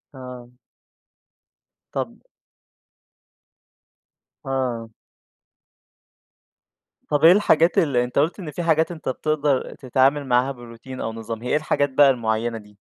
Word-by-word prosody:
آه. 125 -2 -10 1.4
طَب - - -4 2.3
آه. 125 -4 -2 2.2
طَب 145 0 0
إيه 165 - +10
الحاجات 180 -3 +3
اللي 130 -6 +3
أنت 125 +2 -1
قُلت 160 +7 0
إن 165 -6 -6
في 175 - -4
حاجات 160 0 +2
أنت 160 -5 -5
بتقدر 145 0 -1
تتعامل 135 +2 +1
معاها 125 +2 +2
بروتين 120 +1 -10
أو 110 - -3
نظام، 115 0 -6
هي 125 - -5
إيه - - +2
الحاجات 150 -1 +1
بقى 140 +1 +5
المُعيّنة 115 -2 -1
دي؟ 105 -1 -15
130 Hz, 115 wpm, -22 LUFS, 120-150 Hz, 2.3 s, إيه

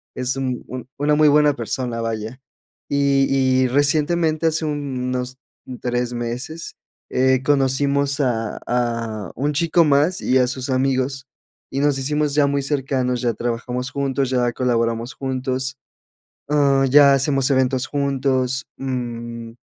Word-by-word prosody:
es 125 +1 -1
un 130 -2 -3
un 130 -1 -7
una 150 +1 +2
muy 155 0 +5
buena 150 0 +4
persona, 120 0 -3
vaya, 115 +2 -4 0.5
y 135 -2 +2
y - - +3
recientemente, 155 +4 +1
hace 160 0 0
unos 130 -3 -3 0.4
3 125 0 -1
meses, 120 +7 -5 0.3
eh, 130 0 +2
conocimos 140 +1 +1
a 115 -4 -1
a 115 -5 -2
un 145 +4 -1
chico 170 +3 +3
más 150 +6 +2
y 130 - +2
a 125 - +3
sus 130 +1 -5
amigos 130 0 0 0.4
y 135 - -2
nos 145 -1 +2
hicimos 150 +1 0
ya 145 -2 +4
muy 140 0 0
cercanos, 135 -3 -1
ya 120 -2 +1
trabajamos 120 +3 -3
juntos, 135 -1 -1
ya 125 -2 +1
colaboramos 115 -1 -1
juntos, 130 0 -3 0.7
ah, 140 -2 +3
ya 140 +1 +7
hacemos 135 0 +1
eventos 130 0 +1
juntos, 135 -2 -1
mm 120 -3 -5
130 Hz, 135 wpm, -21 LUFS, 125-140 Hz, 0.7 s, ya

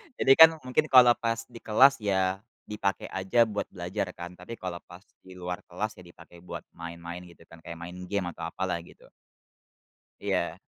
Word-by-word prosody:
Jadi, 135 - +3
kan 160 0 +10
mungkin 140 +5 +1
kalau 125 -3 +8
pas 115 0 -1
di 115 - -10
kelas 130 +5 +5
ya, 95 -2 0 0.2
dipakai 100 -2 -3
aja 95 +5 +2
buat 105 -2 -3
belajar 90 +2 -4
kan 85 +1 -7
tapi 90 +6 -10
kalau 90 -4 -6
pas 90 +3 -13 0.2
di 95 0 -12
luar 90 0 -5
kelas, 105 +5 -3
ya 90 - -13
dipakai 85 0 -16
buat 90 - -8
main-main 85 +1 -8
gitu 85 -1 -17
kan 85 0 -16
kayak 85 +1 -9
main 90 +1 -8
game 95 -2 -2
atau 85 - -6
apalah 90 0 -3
gitu. 85 - -17 1.1
Iya. - - -1
95 Hz, 180 wpm, -28 LUFS, 85-110 Hz, 1.1 s, kan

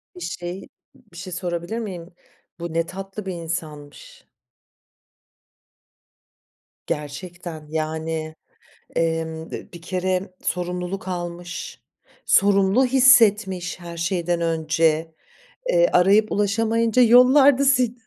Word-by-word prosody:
Bir 180 - -11
şey, 175 +2 -5
ı - - -14 0.4
bir 170 - -14
şey 185 0 -7
sorabilir 175 +4 -4
miyim? 180 -5 -7 0.5
Bu 170 -1 -5
ne 165 0 +1
tatlı 195 +3 -8
bir 190 - -4
insanmış. 160 -4 -7 2.6
Gerçekten, 160 +1 -6
yani, 160 0 -3 0.6
emm, 165 -1 -2
d - - -8
bir 170 -1 -11
kere 185 +1 -2
sorumluluk 180 +2 -3
almış. 175 0 -6 0.5
Sorumlu 200 +5 +4
hissetmiş, 215 -9 +4
her 170 -1 -8
şeyden 175 0 -1
önce, 160 0 0 0.5
eee, - - +4
arayıp 205 +4 +4
ulaşamayınca 225 +3 +2
yollarda 260 +3 +6
seni 260 -3 +4
a - - -16
180 Hz, 105 wpm, -22 LUFS, 165-205 Hz, 2.6 s, yollarda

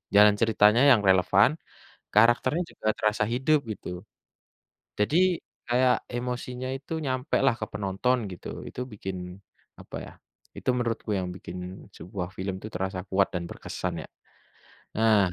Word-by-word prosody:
Jalan 105 0 +8
ceritanya 110 +1 +5
yang 115 -6 +6
relevan, 95 +4 +5 0.7
karakternya 120 +9 +4
juga - - -10
terasa 105 0 +2
hidup 135 +5 +3
gitu. 105 - -6 1.1
Jadi 145 +10 +2 0.5
kayak 125 +1 +4 0.2
emosinya 125 +1 -4
itu 140 +4 -10
nyampe 130 +2 -1
lah 130 -3 +4
ke - - 0
penonton 100 +6 0 0.2
gitu. 90 - -9 0.2
Itu - - -8
bikin 95 -2 -5 0.6
apa - - -9
ya, - - -11 0.4
itu - - -7
menurutku 115 -2 -2
yang 90 -1 -2
bikin 90 +1 -8
sebuah 90 -1 -5
film 95 0 -3
itu 110 - -5
terasa 95 0 -2
kuat 95 0 +3
dan 85 -1 -2
berkesan - - -4
ya. - - -12 0.9
Nah, 110 -1 +5
110 Hz, 135 wpm, -27 LUFS, 95-125 Hz, 1.1 s, Jalan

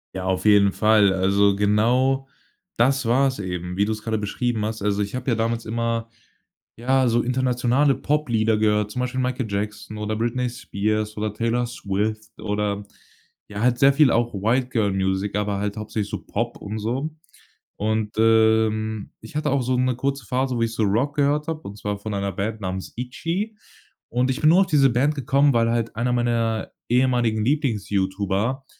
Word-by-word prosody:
Ja, 95 -1 -4
auf 95 0 -1
jeden 100 -2 +5
Fall. 105 -2 +4
Also, 100 +1 +3
genau 120 +7 +2 0.5
das 135 +3 +2
war's 130 +1 +2
eben, 90 -1 -4
wie 100 - +3
du's 110 0 -3
grade 110 -1 -1
beschrieben 110 +2 -2
hast. 110 -1 -3
Also, 105 0 +1
ich 100 +3 -3
habe 125 0 -2
ja 115 - +2
damals 115 +1 -1
immer, 115 0 -2 0.7
ja, 130 +2 +2
so 120 0 +2
internationale 125 +2 +2
Poplieder 120 -8 +1
gehört, 105 -1 +2
zum 125 +4 -3
Beispiel 125 +1 -2
„Michael 125 0 -1
Jackson“ 105 +1 -4
oder 105 +1 -2
„Britney 120 +3 -1
Spears“ 110 -2 -2
oder 105 0 -2
„Taylor 115 +2 0
Swift“ 110 0 -3
oder 105 -1 -2 0.7
ja, 105 +1 -5
halt 120 0 +2
sehr 140 +2 +5
viel 145 -2 +5
auch 120 0 +1
White 115 +6 0
Girl 110 -5 +1
Music, 95 +1 -1
aber 105 -1 -1
halt 105 +1 -3
hauptsächlich 105 -1 -3
so - - -5
Pop - - -3
und 105 +2 -6
so. 130 +8 -2 0.6
Und, 110 0 -1
ähm, 110 -1 +2
ich 155 - -12
hatte 150 -1 0
auch 140 -1 +2
so 130 +1 0
'ne 130 0 +1
kurze 135 0 -2
Phase, 130 0 0
wo 115 - -1
ich 115 0 0
so 110 - 0
Rock 115 +9 +1
gehört 145 +2 +1
habe, 160 -1 -3
und 100 +1 -9
zwar 105 -1 -3
von 105 +1 -6
einer 100 0 -1
Band 105 +3 -3
namens 95 0 -5
„ITCHY“. 165 - -4 0.5
Und 125 +2 +1
ich 130 +1 -1
bin 155 - +5
nur 175 +3 +6
auf - - +3
diese 140 -5 +4
Band 140 +6 +1
gekommen, 140 +1 +2
weil 115 0 +2
halt 115 -1 -1
einer 120 +3 0
meiner 115 -2 0 0.2
ehemaligen 120 -3 +2
Lieblings-YouTuber 105 -2 -1
115 Hz, 180 wpm, -23 LUFS, 105-125 Hz, 0.7 s, nur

